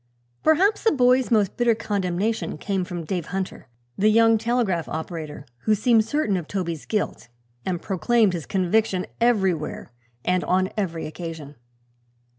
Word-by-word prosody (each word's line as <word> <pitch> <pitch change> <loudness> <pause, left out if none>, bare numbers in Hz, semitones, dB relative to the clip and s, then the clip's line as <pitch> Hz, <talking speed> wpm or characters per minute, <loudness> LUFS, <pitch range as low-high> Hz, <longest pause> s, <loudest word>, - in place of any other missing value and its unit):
Perhaps 375 +7 +3
the 450 - +4
boy's 255 -2 +3
most 210 -5 +2
bitter 240 -2 +3
condemnation 205 0 -2
came 195 -2 -1
from 175 -1 -5
Dave 175 -1 -3
Hunter, 190 -7 -4 0.3
the 210 +2 +5
young 225 0 +5
telegraph 225 -8 0
operator, 155 -3 -5 0.2
who 215 - +4
seemed 220 +1 +3
certain 225 -6 0
of 170 -4 -5
Toby's 170 -6 -4
guilt 210 - -2 0.4
and 180 -2 -1
proclaimed 200 +3 +2
his 165 -4 -5
conviction 190 0 +1
everywhere 190 - 0 0.3
and 180 0 +1
on 185 +1 +1
every 170 -6 -2
occasion. 160 -3 -7
195 Hz, 140 wpm, -24 LUFS, 175-225 Hz, 0.4 s, the